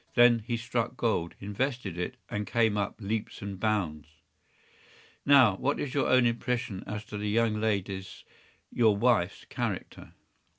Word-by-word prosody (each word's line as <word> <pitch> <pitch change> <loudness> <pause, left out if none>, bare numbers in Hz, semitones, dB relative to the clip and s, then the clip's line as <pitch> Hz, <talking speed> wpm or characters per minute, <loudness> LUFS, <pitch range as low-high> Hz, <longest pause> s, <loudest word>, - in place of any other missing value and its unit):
Then 120 -1 +6
he 115 +2 -3
struck 115 0 -2
gold, 100 -8 0
invested 105 -1 -3
it, 90 0 -4
and 105 0 -4
came 115 -3 +2
up 100 -1 -2
by 115 - -12
leaps 110 +1 -3
and 100 -2 -6
bounds.” 90 -9 -1 1.2
“Now, 130 -8 +7
what 145 +7 0
is 140 - -3
your 140 - +1
own 130 -1 +5
impression 115 -4 -1
as 105 0 -5
to 105 0 -6
the 105 0 -2
young 110 0 +1
lady‚Äôs—your 100 +1 -2
wife’s 105 -5 +1
character? - - -5
110 Hz, 145 wpm, -29 LUFS, 100-120 Hz, 1.2 s, Now